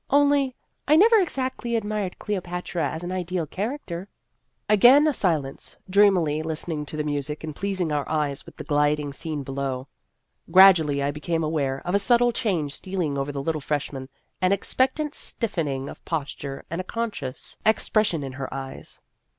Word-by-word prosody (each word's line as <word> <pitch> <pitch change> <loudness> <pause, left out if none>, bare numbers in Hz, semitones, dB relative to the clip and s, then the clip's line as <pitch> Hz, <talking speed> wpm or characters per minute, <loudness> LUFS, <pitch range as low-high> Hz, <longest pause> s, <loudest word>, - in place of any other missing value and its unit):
Only 285 -2 +3 0.3
I 300 - +6
never 445 +7 +7
exactly 260 - -1
ad 225 - -2
mired 210 -3 -3
Cleopatra 180 -4 -3
as 160 - -6
an 175 - -4
ideal 180 -2 -2
character." 195 - -5 0.6
Again 245 +8 +7
a 305 - +3
silence, 155 - -2
dreamily 185 -6 +4
listening 160 -1 -3
to 155 - -5
the 150 - 0
music 150 0 -3
and 155 -2 -5
pleasing 190 -4 -1
our 145 -1 -1
eyes 150 -3 -1
with - - -15
the - - -6
gliding 145 -1 +1
scene 155 -1 -4
below. 135 -1 -3 0.6
Gradually 165 -7 +6
I 140 - +1
be 150 - -8
came 165 -1 -1
aware 140 -4 -1
of 180 - -2
a 200 - +4
subtle 240 +3 +4
change 170 -12 -1
stealing 180 -6 -3
over 140 +1 -2
the 140 -1 -4
little 155 0 -1
freshman 135 -2 -3 0.3
an 185 0 +3
expectant 265 +9 +1
stiffening 150 - -1
of - - -10
posture 140 -3 -4
and 170 +2 -2
a - - -7
conscious 205 - -4
ex 220 0 +2
pression 205 -9 +1
in 135 - -5
her 130 0 -6
eyes. 135 -1 -7
165 Hz, 170 wpm, -25 LUFS, 145-210 Hz, 0.6 s, never